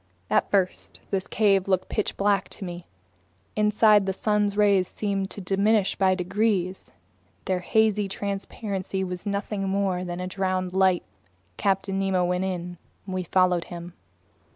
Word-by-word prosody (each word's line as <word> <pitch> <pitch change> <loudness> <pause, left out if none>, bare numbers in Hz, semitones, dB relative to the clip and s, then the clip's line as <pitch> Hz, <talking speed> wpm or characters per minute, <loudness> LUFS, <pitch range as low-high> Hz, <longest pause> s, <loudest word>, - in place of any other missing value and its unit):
At - - +2
first 190 -3 -1
this 195 -1 -1
cave 200 -3 +2
looked 185 -2 +1
pitch 210 - -2
black 200 -1 +1
to 195 - -8
me. 175 -1 -7 0.7
Inside, 210 -1 +4
the 190 - 0
sun's 210 0 0
rays 200 -3 +4
seemed 195 -2 -2
to 205 - -6
diminish 200 +2 +2
by 190 -1 +3
degrees. 190 0 -1 0.5
Their 185 -1 0
hazy 210 +2 +2
transparency 195 -1 -3
was 180 +2 -5
nothing 200 -1 -2
more 190 -2 0
than 180 0 -4
drowned 185 -1 -1
light. 190 -2 +3 0.5
Captain 195 0 0
Nemo 190 -2 +1
went 180 +1 0
in. 175 -2 -4 0.3
We 185 -1 -3
followed 180 -1 +2
him. 175 0 -8
195 Hz, 140 wpm, -25 LUFS, 185-200 Hz, 0.7 s, Inside